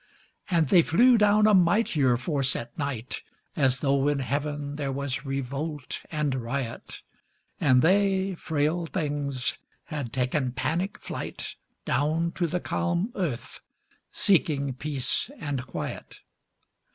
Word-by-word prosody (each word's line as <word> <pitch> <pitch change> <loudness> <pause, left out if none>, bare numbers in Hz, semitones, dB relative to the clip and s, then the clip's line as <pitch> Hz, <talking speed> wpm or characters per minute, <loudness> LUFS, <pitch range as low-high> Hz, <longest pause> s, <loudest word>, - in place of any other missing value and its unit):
And 165 -6 +2
they 175 - +7
flew 240 +10 +5
down 210 -1 +5
a 215 - +5
mightier 170 - +4
force 135 0 +1
at 120 0 -6
night, 135 -5 -4 0.3
As 130 -3 +2
though 140 -1 +2
in 145 -1 +2
heaven 145 +2 -2
there 140 -2 -2
was 135 0 -3
revolt 140 +2 -3
and 150 -3 0
riot, 125 -1 -4 0.6
And 130 -2 +4
they, 195 +1 +3
frail 160 +1 -1
things 145 -6 -2 0.2
had 145 -7 -5
taken 125 +1 0
panic 170 +9 -1
flight - - -6 0.3
Down 155 +6 +1
to 175 -1 -1
the 180 +3 -1
calm 180 +5 -1
earth 160 - -4 0.5
seeking 145 -8 +2
peace 140 - -1
and 140 -4 -4
quiet. - - -6
145 Hz, 125 wpm, -27 LUFS, 135-170 Hz, 0.6 s, they